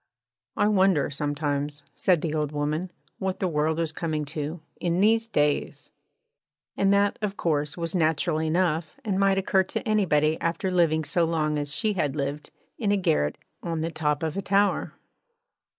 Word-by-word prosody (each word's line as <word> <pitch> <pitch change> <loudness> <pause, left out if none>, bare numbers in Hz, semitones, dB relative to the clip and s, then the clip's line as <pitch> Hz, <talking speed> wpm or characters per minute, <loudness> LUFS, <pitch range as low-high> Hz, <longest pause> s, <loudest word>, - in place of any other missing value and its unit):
'I 205 - +3
wonder 190 -8 +3
sometimes,' 145 0 -2
said 180 -5 +2
the 160 -3 -1
old 150 -2 -1
woman, 150 +4 -2 0.3
'what 190 0 -2
the 190 - +1
world 155 0 0
is 165 -2 -1
coming 155 -2 -2
to, 155 +3 -4 0.2
in 175 0 0
these 225 +3 +3
days!' 145 -8 -1 0.8
And 195 0 +2
that, 200 0 +2
of 205 -1 -2
course, 150 -2 0
was 170 -1 -3
natural 160 -1 +1
enough, 160 - 0
and 195 -3 0
might 195 -1 +3
occur 195 0 +3
to - - -4
anybody 160 -8 +2
after 170 +3 -1
living 165 -3 +2
so 160 +4 +1
long 155 -2 0
as 145 -1 -1
she 215 -1 +1
had 150 -7 -1
lived 145 +1 -3 0.3
in 210 -4 +1
a 205 - +3
garret 160 - +1 0.2
on 165 -2 -3
the 165 +1 -2
top 150 -1 -1
of 160 -1 -2
a 195 - -1
tower. 200 +1 +1
165 Hz, 170 wpm, -26 LUFS, 150-190 Hz, 0.8 s, I